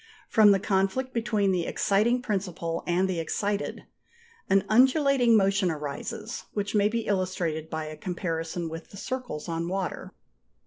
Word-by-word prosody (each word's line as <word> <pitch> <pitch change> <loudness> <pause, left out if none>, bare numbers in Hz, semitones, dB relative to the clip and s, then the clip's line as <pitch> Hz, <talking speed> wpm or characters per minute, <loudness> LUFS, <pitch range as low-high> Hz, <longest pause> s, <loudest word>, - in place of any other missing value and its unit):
From 215 -2 +6
the 195 -1 +5
conflict 195 +7 0
between 210 -4 +1
the 175 -2 0
exciting 235 +5 +2
principle 180 -6 -2
and 180 +2 +2
the 185 -3 -2
excited, 200 +5 -2 0.7
an 195 0 +4
undulating 260 0 +5
motion 195 -1 +2
arises, 155 +9 -5
which 205 -1 -2
may 205 -1 +4
be 230 +1 -1
illustrated 180 -5 -1
by 160 -1 -3
a 155 0 -7
comparison 165 -1 -3
with 165 0 -8
the 200 - -12
circles 250 - -5
on 165 0 -2
water. 190 0 -3
195 Hz, 145 wpm, -27 LUFS, 170-215 Hz, 0.7 s, From